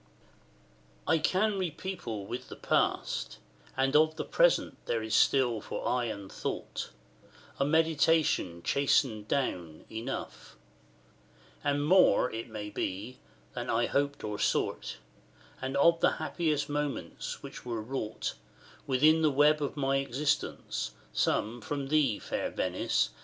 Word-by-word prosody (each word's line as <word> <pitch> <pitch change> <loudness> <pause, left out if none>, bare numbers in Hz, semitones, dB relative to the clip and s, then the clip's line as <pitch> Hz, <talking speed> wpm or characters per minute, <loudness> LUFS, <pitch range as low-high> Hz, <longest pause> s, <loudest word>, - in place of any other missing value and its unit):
XIX. 60 0 -31
I 160 - +5
can 200 +6 +1
repeople 165 - -4
with 120 - -6
the - - -7
past 60 - 0 0.4
and 135 +2 +2
of 155 +1 +5
The - - -4
present - - +2
there 115 -1 0
is 110 0 -4
still 120 -2 +3
for - - -4
eye 125 -1 +1
and 100 -4 -6
thought, - - -4 0.7
And 140 +2 +1
meditation 160 - +2
chastened 130 -6 +2
down, 85 - -2
enough; 115 +4 -6 1.1
And 145 0 +1
more, 180 -6 +5
it 115 +1 -5
may 105 -1 -6
be, 100 +7 -4 0.3
than - - -4
I 115 +1 +2
hoped 140 +2 -1
or 105 -1 -4
sought; - - 0 0.6
And 130 +1 -2
of 165 +3 +5
the - - +4
happiest 155 -2 -1
moments 145 - -4
which - - -9
were 120 -2 -3
wrought 115 -2 -3 0.5
Within 155 +5 +4
the 155 - +4
web 150 +2 +4
of 145 +1 -3
my 135 -1 +2
existence, 135 - -1 0.2
some 115 +3 0
From 140 +3 -4
thee, 140 -8 +3
fair - - -3
Venice! - - 0
135 Hz, 135 wpm, -30 LUFS, 110-150 Hz, 1.1 s, I